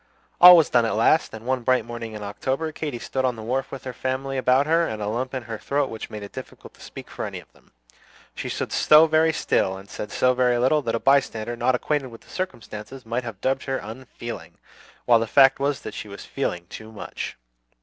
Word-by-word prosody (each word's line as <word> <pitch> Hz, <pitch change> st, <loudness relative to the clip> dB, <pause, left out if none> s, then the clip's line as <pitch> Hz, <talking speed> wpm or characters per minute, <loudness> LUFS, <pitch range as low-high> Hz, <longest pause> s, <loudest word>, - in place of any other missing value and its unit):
All 180 Hz, 0 st, +12 dB
was 160 Hz, -, +4 dB
done 120 Hz, -1 st, +4 dB
at 110 Hz, -3 st, 0 dB
last; 115 Hz, +8 st, +3 dB
and 110 Hz, +1 st, -10 dB
one 130 Hz, 0 st, 0 dB
bright 130 Hz, -2 st, +2 dB
morning 115 Hz, -1 st, -7 dB
in 105 Hz, -1 st, -7 dB
October, 130 Hz, +10 st, -3 dB
Katy 150 Hz, -5 st, -4 dB
stood 130 Hz, +2 st, -3 dB
on 125 Hz, -2 st, +1 dB
the 110 Hz, -, -8 dB
wharf 130 Hz, +4 st, -2 dB
with 135 Hz, -, -7 dB
her 130 Hz, -, -6 dB
family 130 Hz, +2 st, -3 dB
about 130 Hz, +1 st, +3 dB
her, 165 Hz, +2 st, +2 dB
and 110 Hz, -, -5 dB
a 105 Hz, -, -3 dB
lump 125 Hz, +5 st, -3 dB
in 130 Hz, -, -3 dB
her 110 Hz, -2 st, -6 dB
throat 140 Hz, -1 st, -1 dB
which 110 Hz, -, -7 dB
made 105 Hz, -1 st, -7 dB
it 100 Hz, -, -9 dB
difficult -, -, -10 dB
to -, -, -20 dB
speak -, -, -10 dB
to -, -, -7 dB
any -, -, -4 dB
of -, -, -19 dB
them. -, -, -26 dB, 0.6 s
She -, -, -5 dB
stood -, -, -3 dB
so 155 Hz, +1 st, +6 dB
very 160 Hz, 0 st, +3 dB
still 95 Hz, -10 st, 0 dB
and 95 Hz, +1 st, -12 dB
said 105 Hz, +1 st, -7 dB
so 125 Hz, 0 st, +3 dB
very 125 Hz, -1 st, +2 dB
little, 130 Hz, +5 st, +3 dB
that 115 Hz, -4 st, -2 dB
a -, -, -1 dB
bystander 120 Hz, -4 st, +1 dB
not 125 Hz, +2 st, +1 dB
acquainted 145 Hz, +1 st, -1 dB
with 115 Hz, -2 st, -12 dB
the -, -, -21 dB
circumstances 125 Hz, -, -6 dB
might 120 Hz, +3 st, -2 dB
have 110 Hz, -5 st, -8 dB
dubbed 135 Hz, 0 st, 0 dB
her 135 Hz, -1 st, -1 dB
"unfeeling;" 120 Hz, +1 st, -8 dB, 0.5 s
while 120 Hz, -2 st, +5 dB
the 115 Hz, -, -2 dB
fact 135 Hz, +3 st, +5 dB
was 140 Hz, -2 st, -1 dB
that -, -, -7 dB
she -, -, -7 dB
was 100 Hz, 0 st, -9 dB
feeling 90 Hz, 0 st, -3 dB
too 110 Hz, 0 st, -9 dB
much! 110 Hz, -, -7 dB
125 Hz, 235 wpm, -24 LUFS, 110-135 Hz, 0.6 s, All